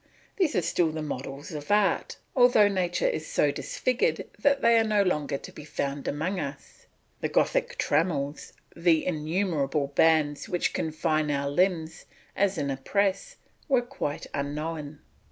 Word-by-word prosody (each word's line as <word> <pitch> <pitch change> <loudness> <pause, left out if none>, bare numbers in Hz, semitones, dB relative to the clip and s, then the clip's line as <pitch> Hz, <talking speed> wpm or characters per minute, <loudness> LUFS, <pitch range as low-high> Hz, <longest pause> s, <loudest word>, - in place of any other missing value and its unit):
These 365 -7 +1
are 180 - +2
still 165 -1 +1
the 155 0 -4
models 140 +1 -6
of 150 -2 -7
art, 205 -1 +2 0.2
although 245 -5 +6
nature 185 -3 0
is 155 0 -2
so 145 - +2
disfigured 255 - -1
that 280 -1 +3
they 230 0 +5
are - - +3
no 210 -2 +2
longer 150 -7 0
to - - -11
be 150 - -10
found 140 -1 -4
among 170 +7 -1
us. 140 -3 -8 0.3
The - - -2
Gothic - - +1
trammels, 145 -3 -1 0.2
the 165 -2 +3
innumerable 155 -4 -1
bands 155 -2 +3
which 175 -1 0
confine 155 -1 0
our 140 -1 -1
limbs 165 -1 0 0.3
as 195 -1 +1
in 140 -2 -1
a 135 - -3
press, 200 - 0 0.3
were 260 -4 +3
quite 240 - -4
unknown. 150 +1 -4
160 Hz, 155 wpm, -27 LUFS, 145-195 Hz, 0.3 s, although